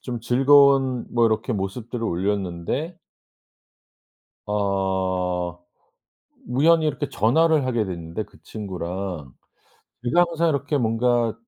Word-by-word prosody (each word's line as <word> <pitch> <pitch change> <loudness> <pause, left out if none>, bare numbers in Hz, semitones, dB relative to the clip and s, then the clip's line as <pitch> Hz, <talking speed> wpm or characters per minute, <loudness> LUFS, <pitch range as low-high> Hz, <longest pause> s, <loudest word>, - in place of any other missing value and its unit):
좀 120 -2 -5
즐거운 135 0 +4
뭐 120 -1 +4
이렇게 110 +3 -1
모습들을 110 +4 -4
올렸는데 100 - -2 1.5
어. 95 -3 -1 0.9
우연히 160 +4 +4
이렇게 145 -1 -2
전화를 145 +5 +2
하게 120 -4 0
됐는데 85 +1 -5
그 100 -1 -21
친구랑. 90 - -6 0.7
제가 175 +8 +3
항상 170 0 0
이렇게 145 +1 -1
뭔가 120 -1 +1
115 Hz, 230 characters per minute, -23 LUFS, 95-135 Hz, 1.5 s, 즐거운